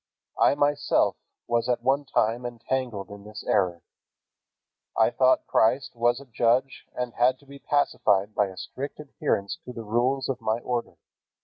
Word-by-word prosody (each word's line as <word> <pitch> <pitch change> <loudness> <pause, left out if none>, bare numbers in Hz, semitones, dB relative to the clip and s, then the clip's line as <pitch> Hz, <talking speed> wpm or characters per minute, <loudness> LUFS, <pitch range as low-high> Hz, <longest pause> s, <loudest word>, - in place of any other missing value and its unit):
I - - +5
myself 145 0 +2 0.3
was 120 +1 0
at 120 -1 0
one 135 +3 +2
time 120 -2 +1
entangled 120 -3 -3
in 100 0 -10
this 105 +1 -9
error. 90 -3 +1 1.1
I 110 +1 +4
thought 130 0 +3
Christ 125 +4 +2
was 120 +1 +2
a 140 - -12
judge 125 +2 0
and 125 -1 -3
had 125 +2 +3
to 140 - -23
be 140 0 -12
pacified 105 -9 +1
by 105 - +2
a 95 -1 -11
strict 140 +10 -6
adherence 115 -8 -2
to 125 - -8
the 115 - -7
rules 125 +5 0
of 130 -2 -3
my 110 0 0
order. 120 -1 -3
120 Hz, 165 wpm, -26 LUFS, 110-135 Hz, 1.1 s, I